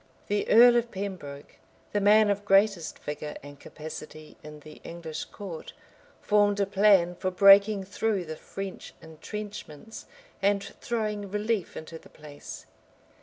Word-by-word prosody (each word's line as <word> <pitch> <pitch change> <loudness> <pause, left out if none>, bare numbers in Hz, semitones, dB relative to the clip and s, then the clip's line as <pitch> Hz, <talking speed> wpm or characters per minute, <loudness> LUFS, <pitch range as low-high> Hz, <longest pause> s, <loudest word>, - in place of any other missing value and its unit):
The 205 0 -1
earl 240 +1 +7
of 235 0 0
Pembroke, 185 -9 -7 0.4
the 205 - +1
man 210 +1 +5
of 200 0 -2
greatest 195 -3 +2
vigor 150 0 -6
and 145 -1 -12
capacity 155 0 -10
in 150 0 -11
the 155 +1 -14
English 165 -2 -7
court, 185 -6 -9 0.5
formed 205 -1 +2
a 200 - +2
plan 195 -3 +4
for 185 +1 -3
breaking 200 +2 +6
through 200 -1 -2
the 155 0 -6
French 195 +4 -8
intrenchments, 205 +3 -9 0.3
and 200 0 +2 0.2
throwing 215 -4 -3
relief 210 -1 -2
into 160 +1 -9
the - - -18
place. 150 -1 -11
195 Hz, 135 wpm, -27 LUFS, 160-205 Hz, 0.5 s, earl